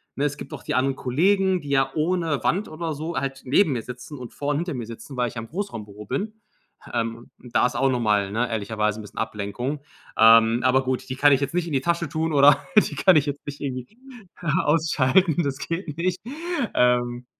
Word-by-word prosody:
Ne, 145 - 0
es 145 -1 -1
gibt - - -9
auch - - -8
die - - -2
anderen 135 +1 +1
Kollegen, 185 +7 +2
die 145 - -9
ja 135 -1 +2
ohne 160 -2 0
Wand 200 +4 +1
oder 160 0 -4
so 160 +4 -5
halt 135 -1 -3
neben 150 +5 +3
mir 120 - -2
sitzen 125 +4 -9
und 125 -2 -9
vor 145 0 -4
und 145 - +1
hinter 170 -1 -2
mir 120 -2 -4
sitzen, 115 +4 -10
weil 120 -1 +1
ich - - -14
ja 115 - -4
im 115 - -9
Großraumbüro 105 - -6
bin. 205 - -3 0.6
Ähm, 115 0 -3
und 125 - -15
da - - +5
ist 125 - -1
auch 135 0 +3
noch 125 -2 0
mal, 105 -3 +2
ne, 120 +3 0
ehrlicherweise 105 0 -1
'n - - -7
bisschen 105 - -14
Ablenkung. 115 +6 -3 0.4
Ähm, 115 +1 +6
aber 130 +1 +3
gut, 130 -1 -2
die 130 - -3
kann 145 +2 +5
ich 135 - +3
jetzt 140 - -2
nicht 175 -1 0
in 155 - -5
die 135 - +3
Tasche 170 -2 -1
tun 160 +1 -1
oder 140 0 +7 0.2
die - - +4
kann 185 -4 +5
ich 145 - +2
jetzt 145 0 -4
nicht 145 0 -7
irgendwie 130 - -5 0.7
ausschalten. 160 +2 +3
Das 135 -1 -2
geht 165 -3 -4
nicht. 180 +1 -1 0.6
Ähm, 120 0 +2
135 Hz, 225 wpm, -24 LUFS, 120-160 Hz, 0.7 s, oder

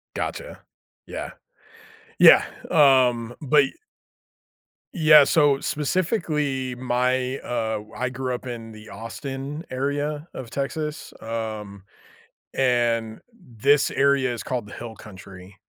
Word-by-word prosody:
Gotcha. - - -5 0.5
Yeah. - - -6 0.9
Yeah, - - +9 0.3
um, 125 -6 +4
but 145 0 +4
y 135 - -7 1.2
Yeah. 155 -6 +7
So, 145 -3 +3
specifically, 150 - -1
my, 125 +1 0
uh, 110 -2 -2
w 105 +1 -13
I 130 - -1
grew 130 -1 -3
up 125 - -7
in 115 -2 -7
the 110 0 -13
Austin 135 - -6
area 145 +3 -2
of 120 -3 -8
Texas, 150 +3 -4
um, 110 -3 -5 0.7
and 120 -3 +1 0.4
this 140 +5 +3
area 135 -2 +2
is 115 - -6
called 120 -5 -3
the - - -11
hill 115 -2 -8
country. 95 -1 -13
130 Hz, 115 wpm, -24 LUFS, 115-145 Hz, 1.2 s, Yeah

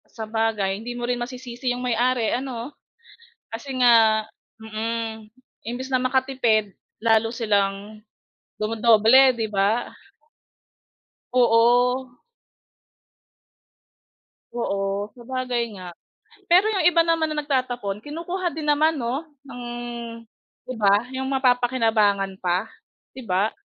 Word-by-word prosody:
Sabagay 220 -3 -1
hindi 245 - -5
mo 240 0 -4
rin 245 - +1
masisisi 250 0 -5
'yong 245 - -3
may-ari 245 -1 +1
ano, 255 +1 -5 0.7
kasi 235 +5 -7
nga, 225 -3 +5 0.4
mm, 220 0 -5 0.3
imbis 245 +3 -5
na 265 - +1
makatipid, 255 -5 +1 0.2
lalo 225 0 +2
silang, 210 -2 -1 0.6
dumodoble 225 +4 +5
'di 225 -2 -3
ba? 210 +4 0 1.4
Oo. 245 +1 +3 2.3
Oo 200 -3 -2
sabagay 250 0 -3 0.2
nga. 180 -1 -8 0.6
Pero 365 +4 +6
yung 380 -6 0
iba 340 -1 +5
naman 325 -1 +1
na 305 - -2
nagtatapon 245 -7 -2
kinukuha 345 +4 -4
din 310 -1 -5
naman 305 +2 +3
no, 250 +5 -2 0.2
ng, 245 -2 -9 1.1
di 255 - -5
ba? 205 +3 +3
Yung 265 0 -3
mapapa-kinabangan 230 -7 +2
pa 180 +4 -1 0.5
di 260 - -8
ba? 195 +1 0
240 Hz, 105 wpm, -23 LUFS, 215-260 Hz, 2.3 s, Pero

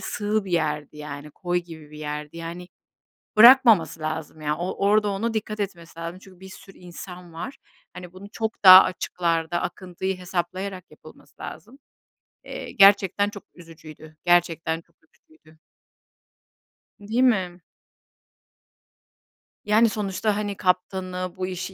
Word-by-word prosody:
sığ 210 0 -2
bir 190 - -7
yerdi, 150 -3 -1
yani. 150 0 -8
Koy 175 +3 -2
gibi 160 -4 -11
bir 150 - -12
yerdi, 150 +1 -6
yani, 170 +2 -7 0.7
bırakmaması 220 - +7
lazım, 155 0 -5
ya. 150 0 -1
O 180 +3 -3
orada 210 0 +3
ona 225 +4 -2
dikkat 215 -1 -4
etmesi 170 -4 -6
lazım 170 +2 -6
çünkü 185 -2 -17
bir 190 0 -12
sürü 195 0 -14
insan 180 0 -11
var. 170 +12 -7 0.4
Hani, 180 -1 -10
bunu 190 +2 -11
çok 220 -1 -4
daha 185 0 +11
açıklarda 170 -2 -2
akıntıyı 185 +1 -4
hesaplayarak 185 +1 -5
yapılması - - -17
lazım. 270 +5 -10 0.6
Eee, - - -8
gerçekten 200 0 +5
çok 205 -2 -11
üzücüydü. 155 -2 -14
Gerçekten 165 -2 +1
çok 170 0 -36
üzücüydü. 155 0 -25 1.4
Değil 220 +5 0
mi? 185 -8 +1 2.0
Yani, 220 +2 +4
sonuçta, 210 0 -2
hani, 205 -2 -3
kaptanı, 185 0 -2
bu 185 0 -3
işi 185 +1 -6
180 Hz, 130 wpm, -24 LUFS, 165-200 Hz, 2.0 s, daha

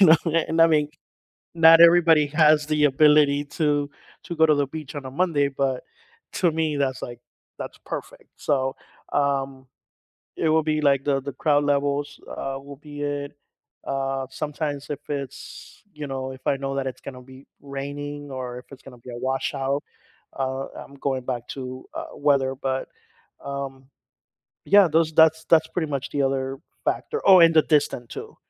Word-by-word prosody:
you - - +8
know, 160 0 +8 0.3
and 165 +1 +1
I 165 - +8
mean, 150 -2 +2 0.7
not 165 0 +7
everybody 170 -3 +6
has 150 0 +4
the 150 -1 +1
ability 145 0 +4
to 145 -1 0 0.3
to 170 - -6
go 160 0 +5
to 155 - +4
the 145 -1 +1
beach 155 -1 -8
on 145 -2 -6
a - - -6
Monday, 145 -1 +1
but 135 -2 -2 0.5
to 175 - +2
me, 160 -2 -1
that's, 135 -2 -1
like 120 -1 -6 0.4
that's - - -7
perfect. - - -7
So, 135 -2 -1 0.4
um, 135 -2 -1 0.7
it 160 - 0
will 160 +1 +3
be, 155 0 0
like, 140 -2 +2
the 140 -2 +1
the 140 +1 -5
crowd 145 +1 +2
levels, 145 0 0
uh, 135 0 -4
will 140 0 -11
be 145 -1 -8
it. 145 -1 -3 0.5
Uh, 135 -1 -2
sometimes 145 0 -4
if 145 -1 -4
it's, 140 -3 -7
you 150 -1 -6
know, 130 -1 -4
if 130 - -14
I 140 - +2
know 135 0 -4
that 135 -1 -2
it's 130 -1 -5
gonna 130 -2 -8
be 130 +1 -15 0.2
raining 145 +1 -6
or 125 -2 -5
if 125 - -14
it's 135 - -13
gonna 130 -2 -13
be 120 +2 -11
a 120 - -7
washout, 135 +2 -1 0.6
uh, 135 0 -2 0.2
I'm 140 - -16
going 135 -1 -2
back 120 -2 -3
to, 130 -1 -7
uh, - - -5
weather, 140 -2 +2
but, 130 0 -3 0.6
um 135 -1 -6 0.8
Yeah, 200 -1 +7
those 160 0 +2
that's 160 0 +5
that's 160 -1 +4
pretty 160 -3 -3
much 140 -1 -3
the 140 - 0
other 135 0 -1 0.3
factor. 450 - -2
Oh, 190 -2 +9
and 165 -1 +7
the 155 - +6
distance 145 -6 0
too. - - -9
140 Hz, 175 wpm, -24 LUFS, 135-155 Hz, 0.8 s, Oh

